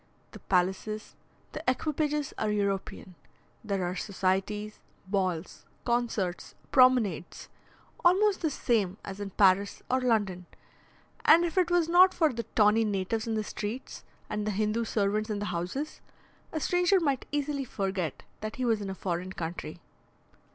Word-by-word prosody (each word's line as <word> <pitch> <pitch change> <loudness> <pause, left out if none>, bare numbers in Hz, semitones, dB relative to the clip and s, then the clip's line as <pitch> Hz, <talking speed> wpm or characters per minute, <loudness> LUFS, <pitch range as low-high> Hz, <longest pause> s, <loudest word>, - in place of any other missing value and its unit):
The - - -11
palaces, 190 +4 -1 0.4
the 305 - -6
equipages 300 +2 -1
are 215 - 0
European; 200 -2 -2 0.5
there 200 -4 -1
are 180 +1 -2
societies, 200 +2 -1 0.3
balls, 185 -3 -2 0.2
concerts, 235 -7 -1 0.2
promenades, 250 - +3 0.5
almost 385 +3 +4
the 320 - +1
same 215 -9 0
as 195 0 -7
in 205 -1 -4
Paris 195 +1 +3
or 255 0 +2
London; 205 -7 0 0.8
and 335 +2 +7
if 335 - -3
it 365 -2 +3
was 350 -2 +3
not 365 +2 +6
for 315 -5 +3
the 235 0 -5
tawny 215 +1 +5
natives 210 +2 -1
in 225 - -1
the 215 - 0
streets, 215 +5 -6 0.2
and 210 0 -3
the - - +1
Hindoo 215 +2 0
servants 215 +1 0
in 210 - -1
the 205 - -3
houses, 180 - -4 0.5
a 315 - -2
stranger 360 +4 +3
might 280 -6 -1
easily 290 -1 -1
forget 190 - -3 0.2
that 215 0 -5
he 255 - -2
was 225 -3 +2
in 200 - -4
a 190 - -4
foreign 180 0 -3
country. 165 -1 -6
215 Hz, 150 wpm, -29 LUFS, 195-265 Hz, 0.8 s, and